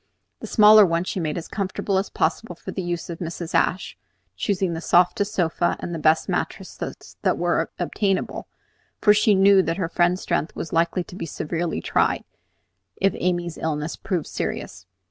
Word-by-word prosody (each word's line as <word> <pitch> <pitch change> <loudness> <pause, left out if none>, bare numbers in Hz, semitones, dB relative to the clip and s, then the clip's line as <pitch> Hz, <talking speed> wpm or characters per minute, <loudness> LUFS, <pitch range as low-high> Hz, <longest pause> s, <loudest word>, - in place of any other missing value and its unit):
The - - -7
smaller 215 -1 +8
one 170 -2 +1
she 185 - -3
made 155 -2 -2
as 170 - -5
comfortable 195 -1 -1
as 195 - -3
possible 225 -6 -1
for - - -8
the 190 - -4
use 175 -1 -3
of 165 - -7
Mrs. 170 -1 -5
Ashe, 185 - 0 0.4
choosing 195 -3 0
for - - -2
it - - -3
the - - -5
softest 180 +4 +3
sofa 175 -1 +1
and 175 - -5
the 165 - -3
best 155 +1 +3
mattresses - - -5
that - - +1
were - - 0
obtainable; 195 -3 -1 0.5
for 210 - +6
she 210 0 +4
knew 195 0 +6
that 165 -1 -2
her 175 -4 -2
friend's 175 +1 +1
strength 155 - -1
was 165 - -6
likely 170 +2 +1
to 175 - -12
be 175 - -5
severely 165 +3 -3
tried - - +1 0.7
if 195 -1 +1
Amy's 175 -2 -1
illness 155 0 -2
proved 180 -6 -3
serious. 90 +1 -5
175 Hz, 185 wpm, -23 LUFS, 165-195 Hz, 0.7 s, smaller